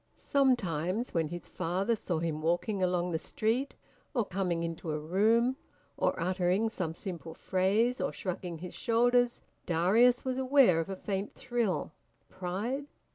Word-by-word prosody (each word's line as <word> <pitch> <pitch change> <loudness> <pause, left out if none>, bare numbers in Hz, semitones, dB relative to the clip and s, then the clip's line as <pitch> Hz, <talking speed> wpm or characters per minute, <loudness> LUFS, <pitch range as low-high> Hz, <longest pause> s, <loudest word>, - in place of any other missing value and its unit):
Sometimes 225 - +1
when 165 -2 +1
his 175 +2 -7
father 185 +6 0
saw 180 -5 -2
him 160 -1 -2
walking 175 +5 0
along 180 -1 +1
the 160 - 0
street, 235 - -1 0.4
or 235 -4 +2
coming 180 -3 -1
into 165 -1 -4
a 150 - -1
room, 220 +10 +2 0.4
or - - 0
uttering 185 +4 +1
some 170 -7 -3
simple 170 -3 -7
phrase, 210 +7 +1
or - - 0
shrugging 180 -2 -4
his 180 +2 -8
shoulders, 245 +1 +2 0.3
Darius 215 +10 +4
was 260 0 -1
aware 260 - +5
of 165 - -2
a 195 - -3
faint 195 +1 -4
thrill. 235 -6 -1 0.4
Pride? 210 +10 -3
190 Hz, 145 wpm, -31 LUFS, 175-235 Hz, 0.4 s, aware